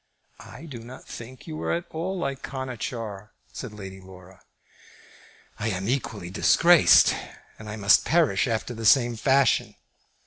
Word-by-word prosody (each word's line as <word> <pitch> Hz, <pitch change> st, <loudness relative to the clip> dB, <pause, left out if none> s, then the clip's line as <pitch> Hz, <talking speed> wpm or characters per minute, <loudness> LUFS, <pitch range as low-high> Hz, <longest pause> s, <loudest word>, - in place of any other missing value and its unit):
"I 155 Hz, -, -12 dB
do 135 Hz, -7 st, -8 dB
not 120 Hz, +3 st, -12 dB
think 120 Hz, +2 st, -10 dB
you 155 Hz, -2 st, -7 dB
are -, -, -2 dB
at 170 Hz, 0 st, -2 dB
all 180 Hz, +4 st, -3 dB
like 140 Hz, -5 st, -3 dB
Conachar," 115 Hz, -5 st, -6 dB, 0.2 s
said 125 Hz, -, -7 dB
Lady 95 Hz, -2 st, -10 dB
Laura. 95 Hz, -1 st, -15 dB, 1.2 s
"I 110 Hz, -, -2 dB
am 95 Hz, -2 st, -3 dB
equally 110 Hz, -8 st, -3 dB
disgraced, 170 Hz, -, +5 dB, 0.5 s
and 110 Hz, -1 st, -9 dB
I 105 Hz, -, -5 dB
must 100 Hz, -1 st, +4 dB
perish 150 Hz, -, +2 dB
after 115 Hz, +1 st, -2 dB
the 115 Hz, -1 st, -2 dB
same 120 Hz, 0 st, +4 dB
fashion. 135 Hz, +4 st, +2 dB
115 Hz, 145 wpm, -25 LUFS, 105-135 Hz, 1.2 s, disgraced